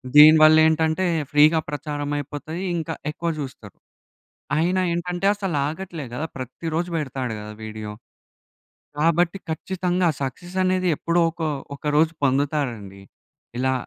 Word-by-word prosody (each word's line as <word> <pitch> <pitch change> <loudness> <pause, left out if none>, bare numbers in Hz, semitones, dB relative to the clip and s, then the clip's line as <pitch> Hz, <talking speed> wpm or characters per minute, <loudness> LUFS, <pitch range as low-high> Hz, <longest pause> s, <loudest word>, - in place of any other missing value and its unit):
దీని 155 +2 +10
వల్ల 155 0 +8
ఏంటంటే 160 +3 +1 0.3
ఫ్రీగా 155 +2 +6
ప్రచారం 145 -1 -4
అయిపోతాది 150 +4 -6 0.2
ఇంకా 165 0 -3 0.2
ఎక్కువ 170 +2 -3
చూస్తరు. 120 -7 -9 0.8
అయినా 180 +4 +2
ఏంటంటే 175 +2 -3
అసలు 195 -5 -3
ఆగట్లేదు 160 -5 -6
కదా! 150 - -2
ప్రతి 130 +6 -7
రోజు 175 +2 -1
పెడతాడు 130 -6 -3
కదా 105 0 -8
వీడియో. 110 -1 -6 1.1
కాబట్టి 170 +3 +2
ఖచ్చితంగా 180 +2 -1
సక్సెస్ 175 +7 -5
అనేది 185 0 +1
ఎప్పుడో 170 +4 0
ఒక 165 - -11 0.3
ఒక - - -19
రోజు 160 +1 +3
పొందుతారండి. 130 -8 -1 0.6
ఇలా 130 +1 +1
155 Hz, 125 wpm, -23 LUFS, 135-175 Hz, 1.1 s, దీని